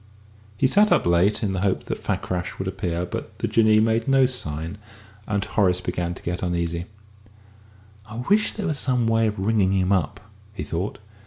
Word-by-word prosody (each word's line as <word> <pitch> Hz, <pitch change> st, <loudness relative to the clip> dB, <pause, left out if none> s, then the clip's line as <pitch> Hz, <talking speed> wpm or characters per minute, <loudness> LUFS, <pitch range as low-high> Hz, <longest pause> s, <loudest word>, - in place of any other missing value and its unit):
He -, -, +2 dB
sat 205 Hz, +10 st, +4 dB
up -, -, +3 dB
late, 85 Hz, +6 st, +2 dB
in 100 Hz, -2 st, 0 dB
the 95 Hz, -, -2 dB
hope 95 Hz, -1 st, 0 dB
that -, -, -5 dB
Fakrash 90 Hz, -1 st, -3 dB
would 95 Hz, -, -4 dB
appear; 90 Hz, -2 st, -2 dB
but -, -, -7 dB
the -, -, -1 dB
Jinnee 110 Hz, -1 st, +4 dB
made 115 Hz, +1 st, +1 dB
no 135 Hz, -1 st, +5 dB
sign, 85 Hz, -, -4 dB, 0.5 s
and 100 Hz, -2 st, -1 dB
Horace 90 Hz, -5 st, +2 dB
began 90 Hz, -1 st, -3 dB
to -, -, -13 dB
get 90 Hz, +1 st, -3 dB
uneasy. 85 Hz, -1 st, -2 dB, 1.2 s
"I 110 Hz, +3 st, -6 dB
wish 210 Hz, +1 st, +3 dB
there 210 Hz, -, -4 dB
was 155 Hz, -6 st, -1 dB
some 125 Hz, -3 st, +1 dB
way 115 Hz, 0 st, +2 dB
of 105 Hz, -, -3 dB
ringing 100 Hz, -1 st, +2 dB
him 95 Hz, 0 st, +1 dB
up," 90 Hz, -7 st, 0 dB, 0.3 s
he -, -, -5 dB
thought. 90 Hz, +5 st, -3 dB
100 Hz, 185 wpm, -23 LUFS, 90-115 Hz, 1.2 s, no